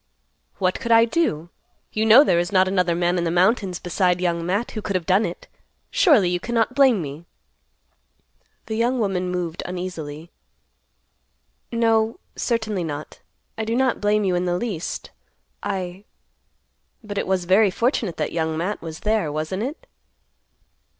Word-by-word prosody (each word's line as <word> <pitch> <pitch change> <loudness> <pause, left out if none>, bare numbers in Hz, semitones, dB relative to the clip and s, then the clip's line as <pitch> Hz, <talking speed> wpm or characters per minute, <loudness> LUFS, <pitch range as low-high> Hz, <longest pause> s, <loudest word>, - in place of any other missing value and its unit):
"What 185 -1 0
could 235 -3 -3
I 230 0 +7
do? 225 - -1 0.4
You 220 +1 +1
know 235 +6 +9
there 175 - +2
is 175 +2 -2
not 190 -1 +4
another 180 -3 +1
man 175 +1 +1
in - - -1
the 170 - 0
mountains 185 +1 +2
beside 180 0 0
Young 170 -2 0
Matt 200 +7 -1
who 215 - -5
could 200 -2 -3
have 180 -3 -1
done 195 +4 +3
it. 170 - -9 0.4
Surely 275 - +5
you 175 0 0
cannot 230 +2 0
blame 260 -9 +4
me." 145 +3 -8 1.4
The 220 - -5
young 240 +3 +1
woman 190 -5 -1
moved 175 -2 -3
uneasily, 170 -3 -6 1.4
"No, 225 +3 +1 0.2
certainly 220 -6 -1
not. 150 -2 -6 0.4
I - - 0
do 225 +1 -1
not 260 0 +1
blame 210 0 +2
you 190 -2 +1
in 175 0 0
the 175 0 0
least. 200 -6 -4 0.5
I—but 195 +3 -9
it - - -3
was 185 -2 0
very 195 +3 +5
fortunate 220 - -1
that 155 - -2
Young 160 -1 -1
Matt 185 +6 -2
was 160 -1 -8
there, 210 -8 0
wasn't 155 +6 -3
it?" 290 - -5
185 Hz, 155 wpm, -23 LUFS, 175-220 Hz, 1.4 s, know